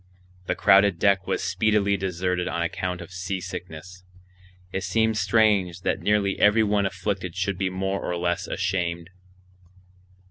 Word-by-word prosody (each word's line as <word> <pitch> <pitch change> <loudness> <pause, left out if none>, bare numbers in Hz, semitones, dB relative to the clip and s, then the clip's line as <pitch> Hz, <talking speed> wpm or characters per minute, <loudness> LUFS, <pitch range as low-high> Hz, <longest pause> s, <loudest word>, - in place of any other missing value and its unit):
The - - 0
crowded 100 -2 +5
deck 95 -1 +2
was - - -1
speedily 105 -2 +1
deserted 90 -1 -2
on 85 - -1
account 90 +1 -3
of 85 - -10
seasickness. 90 -1 -6 0.7
It 95 - -2
seemed 110 +4 +1
strange 105 -6 +2
that - - -1
nearly 105 -2 +1
every 105 +2 +5
one 100 -2 +1
afflicted 95 -2 -4
should 95 0 -2
be 95 -1 0
more 95 +1 -2
or 90 - -2
less 85 +1 -1
ashamed. 90 -2 -2
95 Hz, 140 wpm, -25 LUFS, 90-100 Hz, 0.7 s, crowded